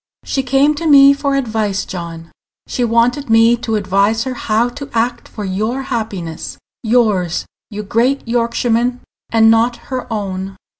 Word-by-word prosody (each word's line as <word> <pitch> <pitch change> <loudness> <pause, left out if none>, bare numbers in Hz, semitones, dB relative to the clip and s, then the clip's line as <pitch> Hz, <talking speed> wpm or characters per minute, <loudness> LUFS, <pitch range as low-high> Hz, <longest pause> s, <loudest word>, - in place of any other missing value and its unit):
"She 270 - -1
came 270 +3 +2
to 330 - -2
me 280 -1 +8
for 280 -1 -1
advice, 220 -6 -1
John. 170 -2 -7 0.3
She 250 - -2
wanted 240 +4 +1
me 225 +1 +5
to 225 -1 -2
advise 200 +2 +1
her 260 - -4
how 230 0 0
to 280 +3 -9
act 235 +1 -1
for 210 - -7
your 215 +8 -2
happiness 200 -9 -4 0.2
yours, 215 -7 +1 0.2
you 210 -1 -6
great 240 +6 0
Yorkshireman, 240 +1 0 0.3
and 225 -1 +5
not 230 +2 +2 0.2
her 255 -1 -4
own." 195 -2 -4
230 Hz, 150 wpm, -16 LUFS, 205-250 Hz, 0.3 s, me